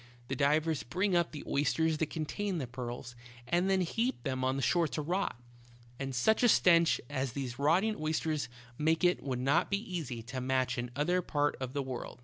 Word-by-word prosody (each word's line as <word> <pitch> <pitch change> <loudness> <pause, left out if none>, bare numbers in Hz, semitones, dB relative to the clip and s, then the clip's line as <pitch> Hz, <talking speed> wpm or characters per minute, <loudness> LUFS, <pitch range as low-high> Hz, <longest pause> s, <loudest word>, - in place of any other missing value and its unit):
The 135 - -1
divers 150 +3 +2
bring 185 +8 0
up 170 -1 +2
the 150 - -7
oysters 155 +3 +1
that 160 - 0
contain 180 +5 -3
the 140 - -2
pearls, 120 -1 -6 0.3
and 175 +7 +2
then 190 -1 +3
heap 230 +9 -1
them 130 -2 -2
on 130 +1 +1
the 135 - -2
shore 170 +6 +3
to 135 +1 -4
rot; 180 -4 -1 0.6
and 135 -1 -3
such 135 - +3
a 245 - +5
stench 170 -5 +5
as 130 -3 -2
these 130 -3 -4
rotting 180 +10 +3
oysters 155 -3 -1 0.3
make 160 +3 +2
it 180 0 +3
would 130 -3 -2
not 135 +3 +2
be 200 - +2
easy 165 - -5
to 130 +2 -5
match 130 -1 0
in 120 - -1
any 120 - -11
other 175 +6 +1
part 145 -3 0
of 130 -1 -4
the 140 -1 -1
world. 130 -2 -6
150 Hz, 205 wpm, -32 LUFS, 130-175 Hz, 0.6 s, a